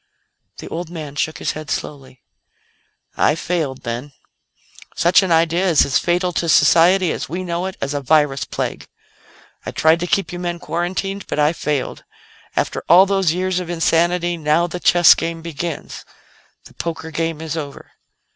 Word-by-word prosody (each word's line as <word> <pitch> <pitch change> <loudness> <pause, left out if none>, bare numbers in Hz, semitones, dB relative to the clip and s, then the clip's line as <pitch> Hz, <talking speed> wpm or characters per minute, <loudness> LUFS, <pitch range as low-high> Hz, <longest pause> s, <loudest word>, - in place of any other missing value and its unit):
The - - -9
old 170 0 -5
man 155 -4 -7
shook 155 +2 -2
his - - -2
head 155 0 -8
slowly. 135 -3 -6 0.9
"I 150 - +3
failed, 155 -6 -3
then. 120 +4 -5 0.8
Such 175 +3 +4
an 190 -2 -2
idea 165 +3 +2
is 160 - +4
as 135 - +1
fatal 180 +1 0
to 170 - -3
society 175 +2 +5
as - - -4
we 180 +3 -4
know 175 +1 -2
it 190 - -7
as 140 +1 -3
a 145 - -2
virus 145 -1 +2
plague. - - -4 0.8
I - - -5
tried 160 +1 +3
to 175 - -3
keep 195 0 0
you 175 - -5
men 175 -1 -3
quarantined, 185 +4 -3
but - - -4
I 150 +2 +3
failed. 150 -5 -3 0.5
After - - -1
all 180 +3 +8
those 195 -4 +1
years 185 +1 -1
of 180 -2 -6
insanity, 175 +1 +1
now 155 +2 +2
the 175 +1 -5
chess 175 -1 +6
game 165 0 -4
begins; 165 -1 -6 0.6
the - - -15
poker 160 -1 -5
game 165 -1 -2
is 160 -1 -5
over." 145 -3 -7
165 Hz, 170 wpm, -19 LUFS, 155-175 Hz, 0.9 s, all